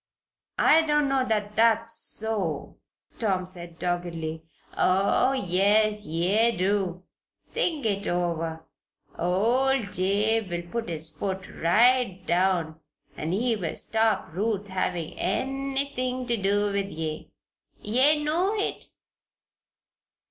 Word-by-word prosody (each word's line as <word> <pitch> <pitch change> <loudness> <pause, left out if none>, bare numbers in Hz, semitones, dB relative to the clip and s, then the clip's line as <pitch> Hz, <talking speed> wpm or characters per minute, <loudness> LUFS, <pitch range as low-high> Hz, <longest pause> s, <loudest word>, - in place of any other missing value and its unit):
"I 320 - +6
don't 295 -2 +2
know 270 -1 +2
that 210 -1 -1
that's 230 0 +3
so," 205 -9 -2 0.4
Tom 190 -5 0
said 175 -2 -6
doggedly. 170 -3 -3 0.3
"Oh, 195 +8 +3
yes, 210 0 +2
ye 200 +8 +2
do. 185 -1 0 0.5
Think 330 - +1
it 200 -2 0
over. 165 -2 -2 0.5
Old 230 +6 +1
Jabe 205 +3 +1
will 175 0 -5
put 235 -1 -3
his 160 -1 -4
foot 190 +2 -4
right 230 +3 +3
down 175 -3 +1 0.4
an' 155 +2 -4
he'll 210 -4 -1
stop 220 -7 0
Ruth 205 +1 -2
havin' 180 -3 -2
anything 270 -1 -2
ter 240 -1 0
do 205 +1 +1
with 200 0 -1
ye 155 -3 -5 0.5
ye 275 +8 +3
know 350 +7 +1
it! 410 - -3
205 Hz, 110 wpm, -26 LUFS, 175-235 Hz, 0.5 s, I